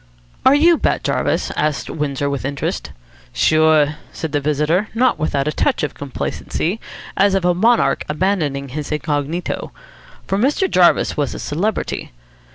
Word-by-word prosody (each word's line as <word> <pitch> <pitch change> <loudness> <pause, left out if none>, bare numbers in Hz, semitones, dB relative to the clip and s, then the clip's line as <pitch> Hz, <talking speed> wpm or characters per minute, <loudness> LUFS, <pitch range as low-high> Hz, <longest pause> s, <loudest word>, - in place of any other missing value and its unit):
"Are 265 - +7
you 330 +2 +5
Bat - - 0
Jarvis?" - - 0
asked 150 -5 -1
Windsor 145 -2 -2
with 140 -1 -2
interest. 140 +1 -3 0.4
"Sure," 155 -1 +3
said 160 - -5
the 145 - +1
visitor, 150 +7 +1
not 250 +2 +2
without 145 -2 0
a - - +1
touch - - 0
of 150 - -2
complacency, 155 - -3 0.4
as 195 0 +3
of 190 -2 0
a 180 - +4
monarch 225 +6 +2
abandoning 150 -5 -1
his 150 +3 -5
incognito. 150 +2 -2 0.5
For 195 - -1
Mr. 290 - +2
Jarvis 180 - +3
was 145 -2 -1
a - - -6
celebrity. 195 +9 -2
155 Hz, 150 wpm, -19 LUFS, 145-195 Hz, 0.5 s, Are